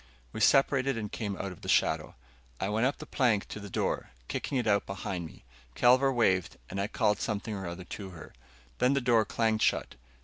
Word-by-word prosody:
We - - -5
separated 135 -1 +4
and 105 -2 -4
came 100 -4 -3
out 100 - -4
of 90 - -12
the - - -7
shadow. - - +2 0.4
I 95 - -1
went 110 +4 +2
up 140 - -2
the - - -8
plank 115 -7 +1
to - - -6
the 100 -1 -8
door, - - -1 0.2
kicking 135 - -2
it 125 - 0
out 100 -2 +2
behind 90 -2 -4
me. - - -16 0.3
Kelvar 130 +3 +5
waved, 95 -8 +1
and 100 +1 -2
I 100 - 0
called 110 -3 +1
something 110 0 -2
or 95 -3 -4
other 85 +2 -6
to 100 0 -7
her. 85 -4 -11 0.5
Then 125 +2 +4
the 140 - +2
door 115 -3 +3
clanged 110 0 0
shut. - - +1
110 Hz, 210 wpm, -30 LUFS, 100-125 Hz, 0.5 s, Kelvar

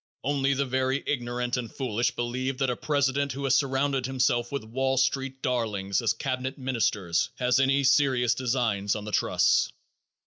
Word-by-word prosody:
Only 140 0 +1
the 140 +1 0
very 130 +1 0
ignorant 125 -2 -2
and 120 -2 -5
foolish 120 -3 -1
believe 130 +2 -2
that 135 -2 +1
a - - -2
president 140 0 0
who 140 +2 -6
has 135 -1 +3
surrounded 135 -1 +1
himself 120 -2 0
with 140 -5 -3
Wall 130 +4 -1
Street 135 0 0
darlings 105 -6 -1
as 115 - +2
cabinet 130 0 -3
ministers 115 -7 0
has 125 0 +2
any 135 +1 +3
serious 130 -3 +3
designs 115 -5 0
on 105 -1 -5
the 105 - -6
trusts. - - +2
130 Hz, 165 wpm, -27 LUFS, 120-135 Hz, -, has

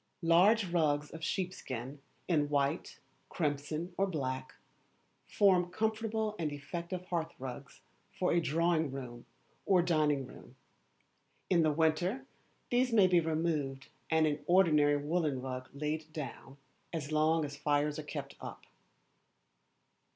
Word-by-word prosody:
Large 190 +6 +5
rugs 150 -4 +1
of 160 0 -9
sheepskin, 140 - -4 0.3
in 150 -4 +2
white, 145 +3 0 0.3
crimson, 155 +2 -2
or 195 - +3
black, 130 -6 -3 0.7
form 185 -3 +3
comfortable 220 +1 -1
and 155 -3 -1
effective 170 +5 -5
hearth 170 -2 -3
rugs 130 +1 -8 0.3
for 190 -2 0
a 170 - +3
drawing 165 0 +1
room 125 -3 -8 0.4
or 185 -3 +5
dining 150 -5 +2
room. - - -14 1.0
In 175 -2 +5
the 155 -1 +3
winter 170 - +1 0.5
these 250 +1 +2
may 210 -4 +6
be 180 -1 +5
removed 155 -4 -1 0.2
and 160 -1 +4
an 145 -1 -1
ordinary 150 -5 +5
woollen 150 -2 0
rug 130 0 -5
laid 155 +2 -3
down 140 -2 -7 0.3
as 155 -3 -4
long 155 +1 +3
as 140 -1 -7
fires 145 +1 0
are - - -5
kept 145 -2 -6
up. - - -8
155 Hz, 130 wpm, -32 LUFS, 145-175 Hz, 1.0 s, may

